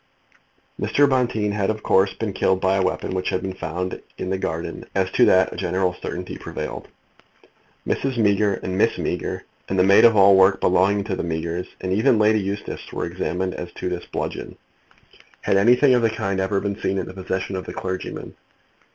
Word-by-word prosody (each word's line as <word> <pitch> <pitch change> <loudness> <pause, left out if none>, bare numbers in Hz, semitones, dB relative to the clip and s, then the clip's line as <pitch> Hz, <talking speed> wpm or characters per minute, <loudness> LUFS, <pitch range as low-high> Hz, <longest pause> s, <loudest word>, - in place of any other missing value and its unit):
Mr. 145 0 +3
Bonteen 120 -6 +1
had, 100 -2 -1
of 110 0 -3
course, 95 +1 +3
been 110 -3 -3
killed 95 0 +1
by 95 +1 +2
the - - +2
weapon 90 0 -2
which 95 0 -1
had 95 - -2
been 95 -1 -3
found 90 +1 -4 0.2
in 95 - -4
the 95 - 0
garden. 80 -2 -4
As - - +1
to - - +4
that - - +4
a - - -9
general 90 0 0
certainty 90 +1 -5
prevailed. - - -6 1.0
Mrs. 135 -2 -1
Meager 105 -2 +2
and 95 - -3
Miss - - +2
Meager, - - -3 0.3
and 95 - -1
the 90 - +5
maid 100 +1 +6
of 115 -2 +7
all 100 0 +7
work 95 +1 +5
belonging 100 +3 +2
to 100 -2 -3
the - - -3
Meagers, 85 +1 -3
and 95 0 -1
even 115 +4 +3
Lady 110 0 +4
Eustace, 100 +1 -5
were - - -3
examined 90 +1 -3
as 90 0 -7
to - - -4
this 90 -1 -5
bludgeon. - - -5 0.8
Had 100 - +2
anything 125 +6 +5
of 125 - +3
the 115 - +3
kind 100 -3 -2
ever 95 +1 0
been 100 -1 -3
seen 95 - 0
in 95 - -2
the - - -9
possession 95 0 -3
of 95 - -5
the - - -6
clergyman? 95 -1 -5
95 Hz, 200 wpm, -22 LUFS, 95-105 Hz, 1.0 s, of